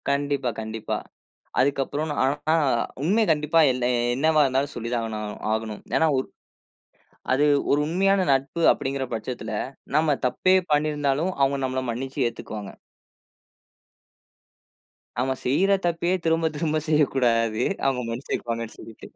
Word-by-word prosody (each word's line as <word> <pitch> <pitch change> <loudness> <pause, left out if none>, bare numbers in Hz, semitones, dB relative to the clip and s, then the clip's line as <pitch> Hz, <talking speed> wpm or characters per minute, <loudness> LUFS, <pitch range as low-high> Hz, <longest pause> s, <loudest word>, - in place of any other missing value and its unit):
கண்டிப்பா 140 -2 0
கண்டிப்பா. 110 0 -4 0.6
அதுக்கு 140 +1 +2
அப்புறம். 150 +4 -3
நான் 145 - -3
ஆனா 135 +2 +2 0.4
அ - - +1 0.2
உண்மை 205 +8 +3
கண்டிப்பா 150 +1 +2
என்னா 125 -1 -1 0.3
என்னாவா 155 +3 +3
இருந்தாலும் 135 +2 0
சொல்லி 115 0 -4
தான் 120 -1 0
ஆகனு 110 -1 -4 0.3
ஆகணும். 110 -1 -4
ஏன்னா 160 - +4
ஒரு 130 - -1 1.0
அது, 135 +3 +3 0.3
ஒரு 145 - +4
உண்மையான 195 +4 +2
நட்பு 135 +4 +1
அப்படிங்கற 135 0 -2
பட்சத்துல, 115 +2 -4 0.4
நம்ம 155 -1 +3
தப்பே 185 +9 +2 0.2
பண்ணீருந்தாலும் 150 +1 +1
அவுங்க 135 0 +3
நம்மள 130 0 -1
மன்னிச்சு 130 +3 -2
ஏத்துக்குவாங்க. 105 -3 -7 2.5
நாம 130 +2 0
செய்ற 180 +10 +2
தப்பையே 170 +1 +1
திரும்பத் 165 -1 +1
திரும்ப 155 0 0
செய்யக் 150 -2 +2
கூடாது. 115 -3 +2 0.2
அவுங்க 130 -2 0
மன்னிச்சிருப்பாங்கன்னு 115 -1 -4
சொல்லிட்டு. 110 - -11
135 Hz, 130 wpm, -24 LUFS, 120-155 Hz, 2.5 s, ஏன்னா